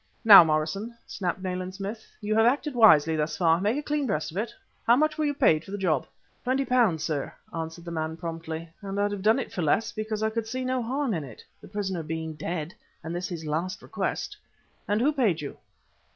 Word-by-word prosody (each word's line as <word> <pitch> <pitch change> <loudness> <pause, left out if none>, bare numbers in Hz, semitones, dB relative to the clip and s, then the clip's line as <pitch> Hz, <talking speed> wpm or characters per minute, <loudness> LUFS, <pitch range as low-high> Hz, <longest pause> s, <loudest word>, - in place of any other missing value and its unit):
"Now, 205 -5 +12
Morrison," 165 +9 -1
snapped 185 -1 -3
Nayland 185 0 -3
Smith, 205 +3 -5 0.2
"you 210 0 -1
have 225 +1 +5
acted 285 +3 +1
wisely 160 -10 +6
thus 155 0 -1
far. 165 -1 +3
Make 210 +6 +1
a 295 - -3
clean 295 -2 -1
breast 160 -9 -1
of 170 - -8
it. 220 +3 -1 0.4
How 235 - +7
much 310 +3 +2
were 310 - 0
you 290 - +1
paid 165 - +3
for - - -14
the 200 - -4
job?" 165 -9 0 0.4
"Twenty 265 +2 +1
pounds, 225 - +2
sir" 150 -4 -2 0.2
answered 165 +1 -5
the 170 - -6
man 160 0 -3
promptly, 165 -1 -5
"and 200 0 -4
I'd 205 0 +1
have 205 -2 -4
done 220 +4 +4
it 265 - -4
for 180 - -2
less, 160 +8 +1
because 215 0 -3
I 220 - +1
could 225 0 -3
see 255 +3 -3
no 255 0 0
harm 260 +1 -1
in 160 -4 -2
it, 125 -6 -11 0.2
the - - -12
prisoner 190 -3 -3
being 160 0 -4
dead, 160 +1 -4 0.3
and 165 +2 -4
this 180 +1 -3
his 170 -4 -6
last 165 +5 -3
request." - - -3 0.5
"And 205 +1 +1
who 295 +5 +3
paid 220 - +2
you?" 145 -2 -6
195 Hz, 225 wpm, -27 LUFS, 160-225 Hz, 0.5 s, Now